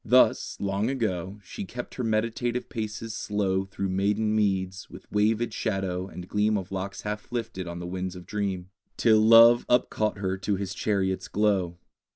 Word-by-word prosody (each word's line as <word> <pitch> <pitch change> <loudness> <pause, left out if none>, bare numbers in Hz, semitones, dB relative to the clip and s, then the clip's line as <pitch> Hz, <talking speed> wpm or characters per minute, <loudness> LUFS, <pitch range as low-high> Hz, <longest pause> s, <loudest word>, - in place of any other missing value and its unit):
Thus, - - +3
long 100 +3 0
ago, 105 -6 -2
She - - -7
kept 125 +6 -7
her 125 - -4
meditative 115 +2 -1
paces 110 0 -4
slow 95 -3 0
Through 95 0 -4
maiden 105 +3 +1
meads, 95 -2 0
with - - -12
wavèd 110 +2 +1
shadow 95 -4 -2
and 90 -2 -9
gleam 105 +2 +2
Of 95 -1 -6
locks 95 +1 -4
half 105 +2 -5
lifted 115 -6 -4
on 85 0 -5
the 85 - -6
winds 90 +1 -4
of 90 -1 -10
dream, 95 -3 -3 0.3
Till 110 -2 +5
love 115 +2 +8
up 125 0 +3
caught 105 -1 0
her 95 -1 -2
to 100 +2 0
his 100 0 -4
chariot's 95 -3 -1
glow. 95 -5 +1
100 Hz, 175 wpm, -27 LUFS, 95-110 Hz, 0.3 s, love